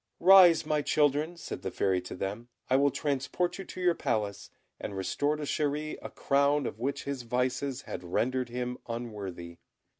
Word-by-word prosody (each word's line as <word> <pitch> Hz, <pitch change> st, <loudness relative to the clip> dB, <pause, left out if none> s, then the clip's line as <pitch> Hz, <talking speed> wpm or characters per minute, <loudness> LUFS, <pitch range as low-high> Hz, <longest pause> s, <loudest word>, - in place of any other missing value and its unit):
"Rise, 180 Hz, -2 st, +8 dB
my 150 Hz, -1 st, +1 dB
children," 150 Hz, +3 st, +1 dB
said -, -, -6 dB
the -, -, -3 dB
Fairy 95 Hz, -2 st, +1 dB
to 90 Hz, -, -8 dB
them, 100 Hz, +6 st, -4 dB, 0.2 s
"I -, -, +5 dB
will 140 Hz, +1 st, +4 dB
transport 145 Hz, +7 st, -1 dB
you 195 Hz, -, -6 dB
to -, -, -9 dB
your 180 Hz, -1 st, +3 dB
Palace, 105 Hz, -9 st, -2 dB, 0.3 s
and 100 Hz, -, -5 dB
restore 145 Hz, +10 st, 0 dB
to 150 Hz, -, -5 dB
Chéri 150 Hz, +1 st, -1 dB
a -, -, -6 dB
crown 140 Hz, 0 st, +2 dB
of 110 Hz, -, -5 dB
which 135 Hz, +4 st, -2 dB
his 140 Hz, -2 st, -4 dB
vices 125 Hz, +2 st, -1 dB
had 90 Hz, -, -6 dB
rendered 125 Hz, +8 st, -1 dB
him 125 Hz, +1 st, -4 dB
unworthy." 100 Hz, -8 st, -6 dB
130 Hz, 175 wpm, -29 LUFS, 115-150 Hz, 0.3 s, Rise